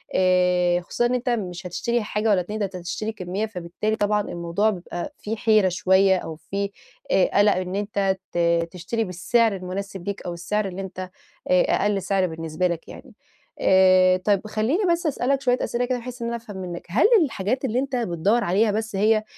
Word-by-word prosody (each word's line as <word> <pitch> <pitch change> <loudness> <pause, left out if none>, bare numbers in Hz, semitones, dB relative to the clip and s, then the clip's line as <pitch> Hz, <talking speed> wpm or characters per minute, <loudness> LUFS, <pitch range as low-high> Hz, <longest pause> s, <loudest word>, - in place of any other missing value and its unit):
آآ 180 -1 +3
خصوصًا 240 +7 -1
إن 245 - +1
أنت 250 0 -2
مش 180 -6 -3
هتشتري 235 +6 -1
حاجة 210 +1 -2
والّا 190 -3 +4
2، 210 +5 -5
ده 205 - +1
أنت 190 -1 -8
هتشتري 180 +5 -4
كمّية، 190 +1 -3
فبالتالي 210 +2 -3
طبعًا 210 -1 +1
الموضوع 175 +4 -1
بيبقى 180 +6 -5
فيه 220 +2 -4
حيرة 215 -3 +3
شوية 190 0 +3
أو 160 -2 -6
فيه 200 +5 -4 0.4
آآ 185 - +4
قَلَق 205 0 +5
إن 185 +1 -3
أنت 200 -2 0 0.2
ت 170 0 +2
تشتري 200 +6 -2
بالسعر 205 +4 +1
المناسب 190 0 -6
ليك 200 - -4
أو 175 -1 -5
السعر 200 +4 -2
اللي 190 +1 -6
أنت 190 -1 -9 0.5
آآ 180 0 +5
أقَل 205 -2 +1
سعر 190 0 +1
بالنسبة 165 +1 -2
لك 170 -2 -3
يعني. - - -12 0.5
آآ 185 -1 +5
طيب 200 +2 0
خلّيني 225 - 0
بس 340 0 -1
أسألك 275 -1 0
شوية 250 -1 +2
أسئلة 245 +1 -1
كده 250 0 -1
بحيث 245 0 -8
إن - - -1
أنا 235 - -2
أفهم 220 -4 -10
منّك، 180 -2 -6
هل 220 - +4 0.2
الحاجات 255 +1 -2
اللي 245 0 0
أنت 270 -1 -1
بتدوَّر 210 +2 +1
عليها 205 +5 +2
بس 220 -1 -2
هي 215 +1 +3
200 Hz, 190 wpm, -23 LUFS, 180-220 Hz, 0.5 s, قَلَق